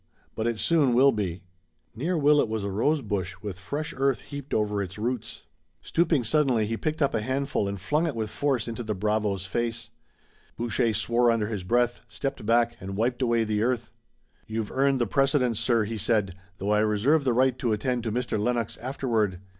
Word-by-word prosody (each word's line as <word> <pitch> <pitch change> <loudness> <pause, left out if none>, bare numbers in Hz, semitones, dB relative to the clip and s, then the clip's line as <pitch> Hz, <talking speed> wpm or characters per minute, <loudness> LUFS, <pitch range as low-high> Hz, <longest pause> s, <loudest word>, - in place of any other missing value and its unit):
"But 110 - -2
it 115 -1 -1
soon 145 -3 +3
will 135 +3 +6
be." 95 -5 -3 0.5
Near 165 +9 -1
Willet 145 -4 +4
was 110 -2 -2
a 100 - -2
rose 140 +9 +1
bush 95 -3 -3
with 100 -3 -5
fresh 150 - -4
earth 135 -3 +1
heaped 140 -1 -8
over 105 -1 0
its 95 0 -6
roots. 115 +1 -3 0.4
Stooping 160 -5 +2
suddenly 125 -3 +2
he 115 +2 -2
picked 155 +5 -1
up 140 - +1
a 115 - 0
handful 130 -2 -1
and 100 0 -4
flung 150 - 0
it 150 - -3
with 110 -2 -3
force 140 -4 0
into 115 0 -4
the 110 -2 -3
bravo's 105 -1 0
face. 115 +4 -3 0.7
Boucher 115 -1 0
swore 120 +1 +2
under 110 -2 +1
his 105 -5 -4
breath, 120 +4 +1
stepped 135 -6 -5
back, 120 0 +3
and 95 0 -6
wiped 120 +3 0
away 115 -2 +2
the 105 -1 -1
earth. 120 -1 -1 0.6
"You've 110 -1 -3
earned 135 0 +2
the 120 - +2
precedence, 130 0 +2
sir," 115 -3 +2
he 110 +1 -4
said, 105 -3 +1 0.2
"though 100 +3 -2
I 105 - +4
reserve 110 +9 +2
the 130 - +2
right 130 +1 +3
to 120 - 0
attend 120 +3 0
to 110 - -1
Mr. 120 -1 -1
Lennox 120 +1 -1
afterward. 115 -7 -1
115 Hz, 195 wpm, -26 LUFS, 105-135 Hz, 0.7 s, will